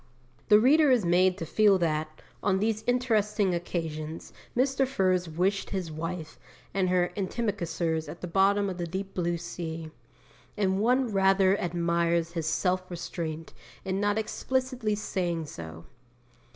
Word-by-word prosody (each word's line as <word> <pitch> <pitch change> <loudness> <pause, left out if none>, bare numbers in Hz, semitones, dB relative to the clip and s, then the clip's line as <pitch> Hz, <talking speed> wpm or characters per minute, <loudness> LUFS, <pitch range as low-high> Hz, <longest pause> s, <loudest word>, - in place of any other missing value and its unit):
The 210 0 +8
reader 290 +6 +5
is 245 -7 +3
made 180 +2 +3
to 165 - -4
feel 205 +3 +4
that, 155 -2 -2 0.2
on 195 -2 +2
these 215 +2 0
interesting 215 -5 +1
occasions, 165 -2 -4 0.2
Mr. 270 +1 +2
Furze 185 -8 +1
wished 190 +5 0
his 185 -5 -3
wife 160 +1 -5 0.3
and 190 -2 +1
her 180 -1 +2
antimacassars 175 -6 -2
at 170 - -8
the - - -3
bottom 200 +3 +3
of 185 -2 -5
the 170 - -2
deep 190 +3 -5
blue 175 -1 -1
sea; 165 -1 -6 0.7
and 190 -2 +1
one 250 +2 +2
rather 195 0 +4
admires 170 -1 0
his 165 -2 -3
self 180 +3 0
restraint 165 -2 -5 0.3
in 190 +1 -1
not 205 +1 +1
explicitly 255 0 -1
saying 175 -5 -2
so. 80 - -9
185 Hz, 140 wpm, -28 LUFS, 170-205 Hz, 0.7 s, The